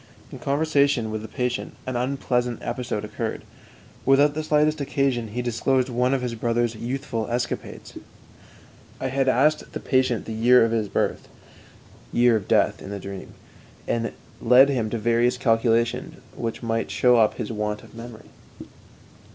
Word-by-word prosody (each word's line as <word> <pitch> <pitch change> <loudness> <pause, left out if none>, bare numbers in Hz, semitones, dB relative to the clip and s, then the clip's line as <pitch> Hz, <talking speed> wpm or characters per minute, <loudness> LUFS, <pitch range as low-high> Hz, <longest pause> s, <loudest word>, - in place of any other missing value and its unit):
In - - -9
conversation 140 -5 +1
with 110 0 -3
the 110 - -7
patient, 125 +1 -3
an 130 - -4
unpleasant 125 -1 -1
episode 120 -3 -3
occurred. 110 +1 -4 0.6
Without 140 +2 +4
the 155 +1 -3
slightest 150 0 +2
occasion 135 -4 0
he 120 +4 -4
disclosed 130 +2 +1
one 125 +1 +1
of 130 - -2
his 125 -1 -2
brother's 115 0 0
youthful 120 0 -4
escapades. 120 +1 -4 1.0
I - - -2
had 135 0 +1
asked 150 +5 +2
the - - -4
patient 130 -4 +1
the 110 - -5
year 120 +2 +5
of 115 - -1
his 110 -3 -1
birth - - -1 0.8
(year 120 -1 +4
of 105 - -2
death - - +2
in - - -8
dream), 100 0 -8 0.5
and 115 0 -1 0.3
led 125 +4 +6
him 120 -6 0
to 115 - -2
various 120 +2 +2
calculations 115 0 +1 0.2
which 115 +1 -4
might 115 0 -1
show 125 -1 +4
up 110 -2 +3
his 105 - -4
want 105 -1 -3
of - - -16
memory. 115 -1 -10
120 Hz, 155 wpm, -24 LUFS, 115-130 Hz, 1.0 s, led